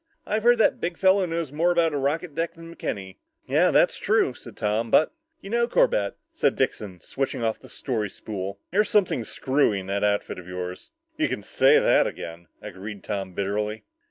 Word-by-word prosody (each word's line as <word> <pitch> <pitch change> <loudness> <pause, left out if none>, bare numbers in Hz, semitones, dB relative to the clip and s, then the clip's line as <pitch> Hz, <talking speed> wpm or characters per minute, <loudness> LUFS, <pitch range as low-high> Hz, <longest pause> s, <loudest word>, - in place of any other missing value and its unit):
"I've 215 +1 0
heard 240 +2 +5
that 225 - +3
big 170 -1 -2
fellow 190 0 +4
knows 165 -4 -3
more 165 +4 +2
about 170 -2 +2
a - - 0
rocket 150 +4 -1
deck 165 +2 -2
than 165 0 -11
McKenny." 95 -2 -5 0.3
"Yeah, - - +3
that's - - +3
true," - - +2
said - - -13
Tom, 110 +2 0
"but 155 - +4
" 330 0 -49
"You 195 - -9
know, 235 0 +2
Corbett," 100 - +2
said - - +1
Dixon, 95 -4 -2
switching 135 0 -3
off 110 -1 0
the - - -15
story 110 -6 -3
spool, 100 -1 -6
"there's 210 +4 +2
something 185 - +2
screwy 130 -3 +1
in 95 - -8
that 100 +1 -2
outfit 100 -2 0
of 90 - -12
yours." 90 0 -6 0.3
"You - - +1
can - - -3
say - - +4
that - - +4
again," 85 0 -7 0.2
agreed 100 +2 -8
Tom 95 -3 -4
bitterly. 105 +2 -2
115 Hz, 195 wpm, -25 LUFS, 100-170 Hz, 0.3 s, heard